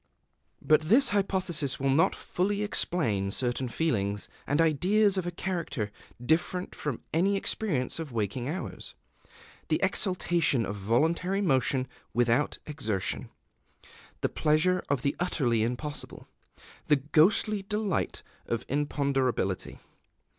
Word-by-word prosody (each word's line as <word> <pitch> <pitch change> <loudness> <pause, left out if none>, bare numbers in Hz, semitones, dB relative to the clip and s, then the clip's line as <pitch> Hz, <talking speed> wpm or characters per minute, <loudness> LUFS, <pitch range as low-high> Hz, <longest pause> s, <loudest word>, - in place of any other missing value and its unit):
But 155 0 +4
this 230 - +4
hypothesis 185 -8 0
will 135 0 +1
not 150 +5 +3
fully 200 +3 -1
explain 115 - 0
certain 125 +4 -1
feelings 105 -8 -1 0.2
and 145 - +1
ideas 185 +6 +3
of 185 -2 -1
a - - -2
character 170 - -3 0.3
different 165 +7 0
from 145 -6 -4
any 195 +5 +2
experience 165 - -1
of 160 -4 -5
waking 115 +3 -2
hours, 185 +5 -6 0.7
the - - +1
exultation 170 - +2
of 100 - -4
voluntary 160 - +1
motion 135 -7 +1 0.3
without 120 +4 +2
exertion, 110 - -2 0.9
the - - +1
pleasure 170 +4 +2
of 140 -4 0
the 140 - 0
utterly 130 -10 +1
impossible, 125 +6 -4 0.6
the 150 - +5
ghostly 165 - +3
delight 210 -1 -2 0.2
of 115 - -2
imponderability. 135 -8 -1
150 Hz, 115 wpm, -28 LUFS, 125-180 Hz, 0.9 s, the